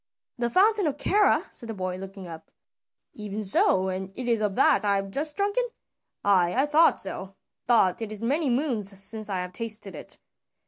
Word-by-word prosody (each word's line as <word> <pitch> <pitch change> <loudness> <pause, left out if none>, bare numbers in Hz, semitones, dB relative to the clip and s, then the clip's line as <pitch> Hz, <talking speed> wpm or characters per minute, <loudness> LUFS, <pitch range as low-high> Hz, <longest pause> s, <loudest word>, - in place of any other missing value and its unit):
"The 240 -1 0
fountain 405 - +3
of 290 -1 -2
Kera?" 410 +7 +2
said 235 - 0
the 225 - -5
boy, 185 -1 -4
looking 195 0 -9
up. 160 -1 -11 0.6
"Even 210 0 -6
so, 190 -1 +3
and 190 +1 -5
it 250 -1 -5
is 230 -2 +1
of 205 -2 -1
that - - +3
I 200 -1 +2
have 195 0 -3
just 295 +6 -4
drunken? 410 +5 0 0.6
Ay, 180 -3 +3
I 270 - +3
thought 305 +3 +4
so, 195 0 -5 0.3
though 220 -7 +4
it 225 -2 -4
is 215 +1 -6
many 285 +5 0
moons 235 -7 0
since 215 +2 +2
I 195 - -2
have 180 0 -6
tasted 215 -3 -5
it." 150 - -4
215 Hz, 190 wpm, -26 LUFS, 190-270 Hz, 0.6 s, thought